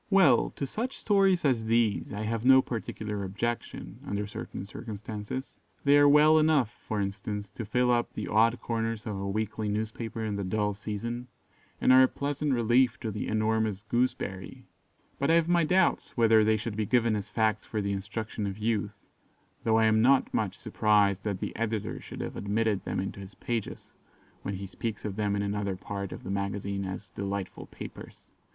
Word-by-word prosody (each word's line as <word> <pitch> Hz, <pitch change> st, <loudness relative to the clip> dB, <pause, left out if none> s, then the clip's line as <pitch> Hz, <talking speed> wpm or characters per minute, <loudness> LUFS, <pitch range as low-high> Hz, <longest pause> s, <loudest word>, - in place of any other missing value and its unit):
Well, 180 Hz, -, +5 dB
to 140 Hz, -, -2 dB
such 230 Hz, -, -4 dB
stories 195 Hz, -5 st, +3 dB
as 120 Hz, -5 st, +2 dB
these 115 Hz, -2 st, +1 dB
I 100 Hz, -, -4 dB
have 115 Hz, +1 st, -2 dB
no 130 Hz, +1 st, +7 dB
particular 105 Hz, -3 st, -4 dB
objection, 115 Hz, +5 st, -4 dB
under 100 Hz, +1 st, -2 dB
certain 100 Hz, -1 st, -7 dB
circumstances. 105 Hz, +4 st, -6 dB, 0.3 s
They 140 Hz, 0 st, +5 dB
are 145 Hz, 0 st, +7 dB
well 155 Hz, +2 st, +6 dB
enough, 155 Hz, -7 st, +3 dB, 0.2 s
for 110 Hz, -, -1 dB
instance, 100 Hz, 0 st, -4 dB
to 115 Hz, +2 st, -6 dB
fill 125 Hz, +4 st, +2 dB
up 120 Hz, -1 st, +1 dB
the -, -, -4 dB
odd 115 Hz, +3 st, +3 dB
corners 115 Hz, -1 st, -2 dB
of 105 Hz, -3 st, -3 dB
a 100 Hz, 0 st, -3 dB
weekly 110 Hz, +1 st, -2 dB
newspaper 110 Hz, +2 st, -3 dB
in 105 Hz, -2 st, -2 dB
the 100 Hz, -, -2 dB
dull 105 Hz, +2 st, 0 dB
season, 115 Hz, +4 st, -5 dB, 0.5 s
and 130 Hz, -, +5 dB
are 130 Hz, -, +8 dB
a 130 Hz, -, +7 dB
pleasant 145 Hz, +1 st, -2 dB
relief 120 Hz, +2 st, +3 dB
to 110 Hz, -, -3 dB
the 105 Hz, -, -4 dB
'enormous 110 Hz, -1 st, 0 dB
gooseberry'; 110 Hz, -5 st, -2 dB, 0.5 s
but 140 Hz, -, +1 dB
I 165 Hz, -, +6 dB
have 170 Hz, -1 st, +3 dB
my 175 Hz, -1 st, +3 dB
doubts 180 Hz, -3 st, +1 dB
whether 110 Hz, -2 st, +5 dB
they 110 Hz, 0 st, +3 dB
should 110 Hz, 0 st, -4 dB
be 110 Hz, -1 st, -1 dB
given 115 Hz, -2 st, +3 dB
as 105 Hz, 0 st, -4 dB
facts 110 Hz, -1 st, 0 dB
for 110 Hz, -, -2 dB
the 100 Hz, -1 st, -1 dB
instruction 105 Hz, +2 st, -4 dB
of 95 Hz, 0 st, -5 dB
youth, 105 Hz, -2 st, -1 dB, 0.7 s
though 110 Hz, -1 st, +3 dB
I 110 Hz, -, +4 dB
am 110 Hz, 0 st, +4 dB
not 130 Hz, +3 st, +4 dB
much -, -, -1 dB
surprised 100 Hz, -3 st, +2 dB
that 100 Hz, -3 st, -2 dB
the -, -, -4 dB
editor 110 Hz, -2 st, -2 dB
should -, -, -8 dB
have -, -, -5 dB
admitted 105 Hz, 0 st, 0 dB
them -, -, -2 dB
into 95 Hz, +1 st, -4 dB
his 95 Hz, 0 st, -10 dB
pages, 115 Hz, -3 st, -4 dB, 0.5 s
when 100 Hz, -, -3 dB
he 100 Hz, +1 st, -5 dB
speaks 110 Hz, +3 st, -5 dB
of 100 Hz, -2 st, -3 dB
them 105 Hz, -1 st, 0 dB
in 100 Hz, -, 0 dB
another 100 Hz, -1 st, -1 dB
part 100 Hz, +1 st, -5 dB
of -, -, -8 dB
the 95 Hz, -, -4 dB
magazine 100 Hz, 0 st, -2 dB
as 95 Hz, +1 st, -6 dB
"delightful 100 Hz, -1 st, -4 dB
papers." -, -, -11 dB
110 Hz, 190 wpm, -29 LUFS, 100-120 Hz, 0.7 s, are